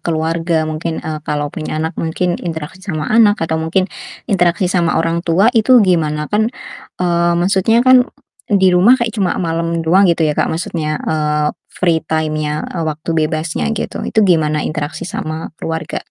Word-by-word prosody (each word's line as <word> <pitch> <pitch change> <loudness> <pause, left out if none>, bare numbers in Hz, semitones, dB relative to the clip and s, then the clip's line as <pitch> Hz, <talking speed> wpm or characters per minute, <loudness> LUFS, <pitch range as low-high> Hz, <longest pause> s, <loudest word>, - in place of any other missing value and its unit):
keluarga, 165 0 -1
mungkin, 155 +1 -4
eee, 155 -1 -4
kalau 145 -1 -2
punya 155 0 -4
anak 160 +1 -2
mungkin 175 +2 -1
interaksi 165 +1 -6
sama 160 -6 -4
anak, 215 -2 +5
atau 160 0 -1
mungkin 170 +4 +1 0.5
interaksi 180 -1 +2
sama 170 -2 +1
orang 165 +1 0
tua, 190 +7 +4
itu 245 +2 +5
gimana? 155 -5 +1
Kan, 215 +1 +2 0.5
eee, 170 -1 +2
maksudnya 195 +6 +2
kan 255 -1 +6 0.4
di 190 -2 +4
rumah 210 +9 +6
kayak 235 -2 -2
cuma 195 -5 0
malam 165 -1 -1
doang 185 +4 +4
gitu 165 -1 +2
ya, 150 - +1
Kak, - - 0
maksudnya, 160 -2 -2
eee, 150 -1 0 0.2
free 170 -3 0
time-nya, 155 -1 -1
eee, 170 - -4
waktu 155 +2 -5
bebasnya 160 0 -1
gitu, - - -4
itu 220 - +2
gimana 155 -4 +2
interaksi 155 -1 -4
sama 160 -3 -5
keluarga? 160 -1 -5
165 Hz, 165 wpm, -16 LUFS, 155-185 Hz, 0.5 s, kan